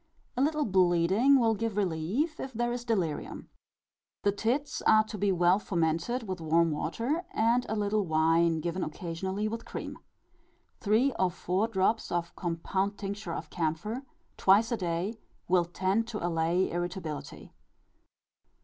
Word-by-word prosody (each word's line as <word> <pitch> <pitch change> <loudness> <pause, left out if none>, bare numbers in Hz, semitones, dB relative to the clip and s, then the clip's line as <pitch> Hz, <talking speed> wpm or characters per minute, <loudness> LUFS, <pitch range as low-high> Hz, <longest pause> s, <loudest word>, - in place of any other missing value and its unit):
A 250 - 0
little 300 +1 +2
bleeding 190 +7 +4
will 225 -2 +3
give 220 -1 -3
relief 200 - -1
if 265 - -5
there 240 +1 -1
is 240 0 -3
delirium. 190 -10 -2 0.7
The 200 - +3
tits 255 +7 -1
are 215 0 +6
to 215 0 -8
be 200 -1 +1
well 180 +1 +4
fomented 170 +7 -1
with 185 -2 -4
warm 165 +1 +3
water, 250 - -2
and 235 +2 +2
a 220 - -1
little 210 0 +1
wine 165 +1 +3
given 175 +3 -2
occasionally, 190 +6 -3
with 230 +1 -4
cream. - - -7 0.8
Three 225 +6 +2
or 185 - +3
four 185 +4 -1
drops 220 +1 0
of 170 -1 -2
compound 190 +3 -2
tincture 200 -3 -5
of 155 - -7
camphor, 175 +9 -2 0.4
twice 205 +5 +4
a 235 - +1
day, 180 +4 -2 0.3
will 180 -1 +3
tend 190 +6 0
to 215 -6 -4
allay 170 +2 +1
irritability. 175 -3 -5
195 Hz, 145 wpm, -29 LUFS, 170-225 Hz, 0.8 s, are